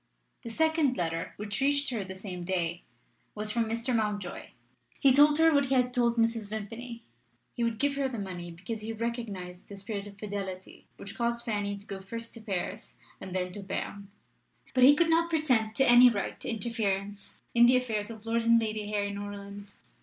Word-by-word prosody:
The 235 - -7
second 315 0 +2
letter, 165 -1 -2
which 210 +3 -3
reached 285 0 +3
her 225 -5 -2
the 190 0 -8
same 185 -2 -6
day, 175 -2 -1 0.5
was 210 0 -2
from 230 +1 +1
Mr. 230 +3 -1
Mountjoy. 210 -4 -2 0.5
He 275 - +6
told 295 +3 +6
her 325 0 +5
what 285 -1 +4
he 265 - +1
had 250 -1 +2
told 235 -1 +2
Mrs. 230 -2 +1
Vimpany: 225 +3 -6 0.5
he 240 - -2
would 230 -1 0
give 280 +2 +1
her 275 -1 +1
the 245 - -5
money, 180 -4 -5
because 185 +6 -6
he 225 +1 -4
recognised 215 -6 -5
the 200 - -9
spirit 200 0 -5
of 200 -1 -12
fidelity 195 -3 -6
which 200 - -9
caused 235 0 -1
Fanny 205 -2 -2
to 200 - -14
go 195 -2 -6
first 230 +4 -7
to 230 - -10
Paris 195 -5 -4 0.2
and 190 -1 -7
then 180 -1 -1
to 205 - -8
Berne. 200 +1 -5 0.7
But 255 -1 +6
he 285 +2 +8
could 335 +2 +3
not 335 +1 +3
pretend 250 -9 +1
to 270 - +3
any 245 +1 +9
right 205 -4 -3
to - - -4
interference 205 -3 -2 0.2
in 235 0 +7
the 255 +1 +6
affairs 220 -4 -2
of 220 -1 -10
Lord 230 +1 +1
and 230 0 +5
Lady 215 -2 -3
Harry 205 -1 -1
Norland. 200 0 -8
220 Hz, 200 wpm, -29 LUFS, 200-240 Hz, 0.7 s, any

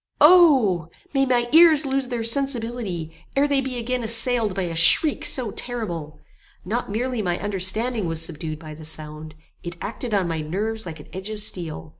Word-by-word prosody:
O! 275 - +5 0.3
may 270 -1 +2
my 240 -1 +1
ears 315 -1 +6
lose 270 -1 -1
their 240 -2 -3
sensibility, 230 - -1 0.2
ere 280 +1 +3
they 280 -1 +1
be 260 -1 -5
again 250 +1 -2
assailed 230 -2 +1
by 195 - -2
a 170 -2 -4
shriek 170 - +5
so 245 -5 +1
terrible! 175 -13 -5 0.5
Not 225 +6 -3
merely 240 +3 -2
my 175 -3 -1
understanding 205 +3 -1
was 165 -1 +1
subdued 160 -1 -3
by 155 -1 -10
the 155 +1 -12
sound: 155 0 -7 0.3
it 170 0 -8
acted 225 +1 -4
on 190 -3 +1
my 165 -2 -3
nerves 210 +7 -3
like 160 -2 -8
an - - -13
edge 190 +3 -6
of 215 -1 -5
steel. 165 - -3
215 Hz, 180 wpm, -22 LUFS, 170-250 Hz, 0.5 s, ears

